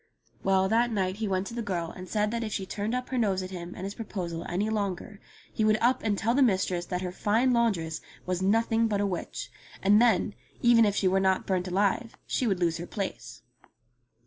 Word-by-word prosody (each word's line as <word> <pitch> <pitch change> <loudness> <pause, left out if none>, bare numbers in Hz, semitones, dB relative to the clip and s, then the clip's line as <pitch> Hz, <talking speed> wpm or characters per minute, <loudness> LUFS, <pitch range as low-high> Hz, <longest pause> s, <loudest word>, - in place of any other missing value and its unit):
Well, 190 0 +3
that 235 +3 +2
night 190 -3 -1
he 220 -1 -2
went 190 0 0
to 230 - -7
the 235 - -3
girl 175 -6 -3
and 185 0 -10
said 210 0 +1
that 235 0 -2
if 215 - -4
she 195 - -2
turned 210 +5 -3
up 250 0 -3
her 255 - -1
nose 195 -4 +1
at 185 - -7
him 175 -1 -7
and 185 - -7
his 195 +1 -4
proposal 180 -7 -5
any 195 +5 0
longer, 205 -2 -3 0.3
he 220 - 0
would 215 0 +4
up 245 +3 +2
and 210 -3 0
tell 230 +4 +1
the 280 - +3
mistress 185 -7 +2
that 180 0 -3
her 180 - -3
fine 225 +7 +2
laundress 180 -10 0 0.2
was 180 0 -1
nothing 225 +3 +2
but 205 -2 0
a 205 - +1
witch; 185 -3 -4 0.3
and 205 +3 +6
then, 230 -3 +3 0.3
even 235 -1 +6
if 205 -1 +1
she 195 - +2
were 190 +1 +3
not 190 -1 +2
burnt 185 -1 0
alive, 200 +5 0
she 250 - 0
would 195 -4 +1
lose 170 -2 +1
her 170 +1 -6
place. 200 -3 -5
200 Hz, 225 wpm, -28 LUFS, 185-225 Hz, 0.3 s, and